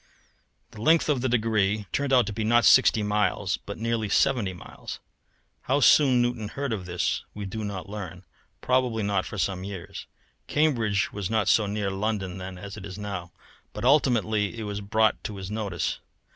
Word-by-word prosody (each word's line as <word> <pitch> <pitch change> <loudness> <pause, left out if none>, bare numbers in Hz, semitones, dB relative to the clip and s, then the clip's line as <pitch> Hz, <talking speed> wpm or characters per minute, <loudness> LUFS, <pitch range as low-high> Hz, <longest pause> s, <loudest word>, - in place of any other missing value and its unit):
The 105 - -10
length 160 +5 +4
of 140 -4 +2
the 130 - 0
degree 110 -3 +1
turned 140 -1 -1
out 125 -3 +5
to 105 - -4
be 110 - -3
not 120 +2 +4
sixty 115 -4 +6
miles, 105 -2 0
but 100 - -5
nearly 115 -1 -1
seventy 120 -3 +2
miles. 90 - -9 0.7
How 135 +2 +3
soon 130 -3 +5
Newton 120 -3 -2
heard 140 +2 -3
of 95 -4 -5
this 90 0 -1
we 105 -1 -5
do 110 +3 -5
not 100 -2 -5
learn 95 -3 -7 0.4
probably 125 -4 +1
not 100 -2 0
for 110 - -7
some 95 -1 -1
years, 95 -3 -7 0.4
Cambridge 115 -10 +1
was 100 -3 -3
not 110 -2 +1
so 110 -2 +4
near 100 -1 -2
London 95 -2 -2
then 95 0 -7
as 100 +3 -8
it 100 - -9
is 95 0 -8
now, 100 -4 -5 0.4
but 105 - -5
ultimately 115 -6 +2
it 110 - -4
was 105 -1 -4
brought 110 +2 +1
to 105 - -4
his 95 0 -7
notice. 100 -6 -2
105 Hz, 185 wpm, -26 LUFS, 100-115 Hz, 0.7 s, sixty